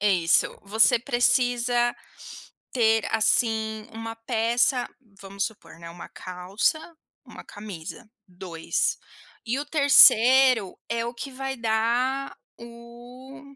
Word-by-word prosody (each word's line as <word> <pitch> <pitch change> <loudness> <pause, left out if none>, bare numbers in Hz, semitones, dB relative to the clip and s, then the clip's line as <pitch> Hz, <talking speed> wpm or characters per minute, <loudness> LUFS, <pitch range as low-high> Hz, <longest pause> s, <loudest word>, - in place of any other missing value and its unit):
Isso, 185 -5 +1
você 220 +4 +3
precisa 245 0 0 0.8
ter, 225 -3 +1
assim, 220 -1 0
1 225 0 -8
peça 240 +2 0 0.3
vamos 195 +1 -5
supor, 215 -6 -10
né, 170 0 -10
1 170 +1 -12
calça, 185 - -3 0.5
1 - - -13
camisa, 205 +2 -11 0.2
2. 175 -3 -3 0.5
E 240 +4 -2
o - - -5
3° 260 - +5
é 230 0 -3
o 235 - -7
que 255 +4 -8
vai 265 +1 -6
dar 235 +4 -2 0.2
o 240 +3 -14
230 Hz, 105 wpm, -24 LUFS, 210-245 Hz, 0.8 s, 3°